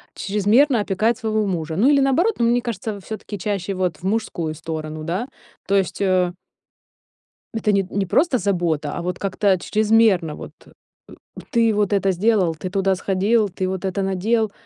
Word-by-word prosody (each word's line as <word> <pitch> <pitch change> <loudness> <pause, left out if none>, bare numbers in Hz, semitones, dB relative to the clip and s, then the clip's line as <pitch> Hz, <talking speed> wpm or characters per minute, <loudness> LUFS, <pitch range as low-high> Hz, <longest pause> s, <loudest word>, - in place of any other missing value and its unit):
чрезмерно 215 +6 +2
опекает 215 +4 0
своего 220 -1 0
мужа. 165 -4 -3
Ну, 220 +10 +3
или 285 -1 +5
наоборот, 330 +11 +2
но 235 - +3
мне 240 +1 +2
кажется, 220 -3 -4
всё-таки 210 +1 -7
чаще 195 0 -2
вот 180 -4 -1
в - - -22
мужскую 185 -6 -2
сторону, 155 -1 -6
да. 180 +10 -2 0.4
То 200 - +2
есть, 190 -1 -1
э 185 -2 +2 1.2
это 220 -2 0
не 195 -1 +2
не 195 0 -1
просто 280 - +2
забота, 170 -7 -1
а - - -4
вот 180 +1 -4
как-то 195 0 +1
чрезмерно, 215 -7 +2
вот. - - -9 0.2
"Э, - - -18 0.8
ты 230 -4 +3
вот 205 -1 +1
это 195 -1 +2
сделал, 185 -3 +2
ты 180 +4 -6
туда 195 0 +1
сходил, 200 +3 +1
ты 185 +1 -3
вот 190 0 -3
это 190 +1 -1
надел?" 205 +3 0
195 Hz, 170 wpm, -21 LUFS, 180-220 Hz, 1.2 s, или